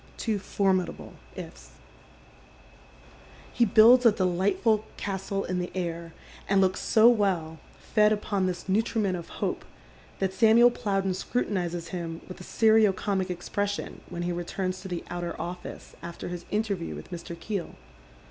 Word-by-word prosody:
Two 215 Hz, -3 st, -1 dB
forminable 190 Hz, -2 st, -1 dB
" -, -, -23 dB
ifs." -, -, -17 dB, 1.8 s
He 240 Hz, -, +3 dB
builds 230 Hz, +4 st, +7 dB
a 230 Hz, -, +7 dB
dehglitful 190 Hz, +3 st, +1 dB, 0.2 s
castle 195 Hz, 0 st, -3 dB
in 185 Hz, 0 st, -2 dB
the 180 Hz, -, -3 dB
air, 170 Hz, -2 st, -3 dB, 0.4 s
and 195 Hz, 0 st, +4 dB
looks 190 Hz, -1 st, +2 dB
so 220 Hz, +1 st, +5 dB
well, 185 Hz, -9 st, +2 dB, 0.2 s
fed 210 Hz, -1 st, +2 dB
upon 205 Hz, -2 st, 0 dB
this 180 Hz, 0 st, -4 dB
nutriment 205 Hz, -1 st, +1 dB
of 170 Hz, -2 st, -7 dB
hope, -, -, -3 dB, 0.5 s
that 190 Hz, -1 st, -1 dB
Samuel 235 Hz, +3 st, +6 dB
Plowden 195 Hz, -4 st, -1 dB
scrutinizes 175 Hz, -5 st, -2 dB
him 165 Hz, -2 st, -5 dB
with 185 Hz, 0 st, -9 dB
a -, -, -8 dB
serio 220 Hz, 0 st, +4 dB
comic 190 Hz, 0 st, -2 dB
expression 200 Hz, +3 st, -3 dB
when 175 Hz, 0 st, -4 dB
he 175 Hz, -, -1 dB
returns 185 Hz, +2 st, -3 dB
to 190 Hz, -, -7 dB
the 175 Hz, -2 st, -4 dB
outer 175 Hz, -1 st, -4 dB
office 175 Hz, +1 st, -7 dB
after 170 Hz, +1 st, -7 dB
his 175 Hz, -1 st, -6 dB
interview 205 Hz, -5 st, -2 dB
with -, -, -10 dB
Mr. 170 Hz, -1 st, -7 dB
Keel. 195 Hz, 0 st, -4 dB
190 Hz, 145 wpm, -27 LUFS, 175-210 Hz, 1.8 s, builds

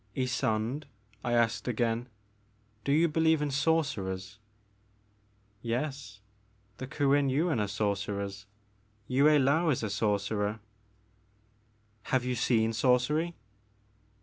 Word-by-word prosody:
'* 100 Hz, -, -22 dB
Ysonde," 125 Hz, +1 st, -1 dB, 0.4 s
I 120 Hz, -, -1 dB
asked 115 Hz, 0 st, +1 dB
again, 120 Hz, 0 st, -1 dB, 0.7 s
do 140 Hz, -, 0 dB
you 160 Hz, +4 st, +4 dB
believe 160 Hz, 0 st, +2 dB
in 145 Hz, -1 st, -1 dB
sorcerers? 110 Hz, -, -1 dB, 0.6 s
" 105 Hz, 0 st, -38 dB
Yes, 130 Hz, -7 st, -5 dB, 0.6 s
the 130 Hz, -, -6 dB
Kuen 140 Hz, -1 st, +2 dB
Yuin 150 Hz, 0 st, +1 dB
are 105 Hz, -, 0 dB
sorcerers; 100 Hz, -1 st, -3 dB, 0.6 s
Yue 130 Hz, +4 st, +2 dB
Laou 150 Hz, +2 st, +4 dB
is 125 Hz, -, -1 dB
a 110 Hz, -, -2 dB
sorcerer." 105 Hz, 0 st, -1 dB, 1.5 s
Have 130 Hz, -1 st, 0 dB
you 125 Hz, -, 0 dB
seen 115 Hz, -2 st, +1 dB
sorcery 130 Hz, +8 st, +2 dB
120 Hz, 110 wpm, -30 LUFS, 105-140 Hz, 1.5 s, you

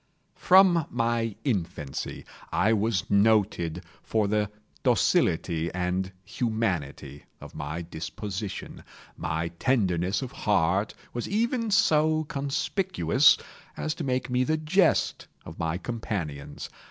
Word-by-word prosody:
From 180 Hz, -4 st, +5 dB
my 115 Hz, -2 st, 0 dB
infancy 85 Hz, -, -3 dB, 0.3 s
I 110 Hz, +4 st, +3 dB
was 105 Hz, -3 st, 0 dB
noted 100 Hz, -5 st, +2 dB, 0.2 s
for 110 Hz, -2 st, 0 dB
the 105 Hz, 0 st, +1 dB, 0.3 s
docility 80 Hz, 0 st, +2 dB
and 90 Hz, +1 st, -1 dB
humanity 90 Hz, -, -3 dB
of -, -, -11 dB
my 75 Hz, +4 st, -4 dB
disposition. 95 Hz, +5 st, -6 dB, 0.3 s
My 80 Hz, +1 st, -2 dB
tenderness 95 Hz, -5 st, +1 dB
of 125 Hz, -, -6 dB
heart 100 Hz, -3 st, +1 dB, 0.2 s
was 120 Hz, -, -4 dB
even 230 Hz, +2 st, 0 dB
so 155 Hz, -6 st, +3 dB
conspicuous 140 Hz, -, +2 dB, 0.4 s
as 155 Hz, -, -1 dB
to 165 Hz, -, -6 dB
make 130 Hz, -2 st, -1 dB
me 125 Hz, 0 st, +1 dB
the 155 Hz, +4 st, +1 dB
jest 165 Hz, +3 st, +2 dB, 0.2 s
of 80 Hz, -, -10 dB
my 80 Hz, 0 st, -1 dB
companions. 90 Hz, -9 st, -5 dB
105 Hz, 110 wpm, -27 LUFS, 85-140 Hz, 0.4 s, From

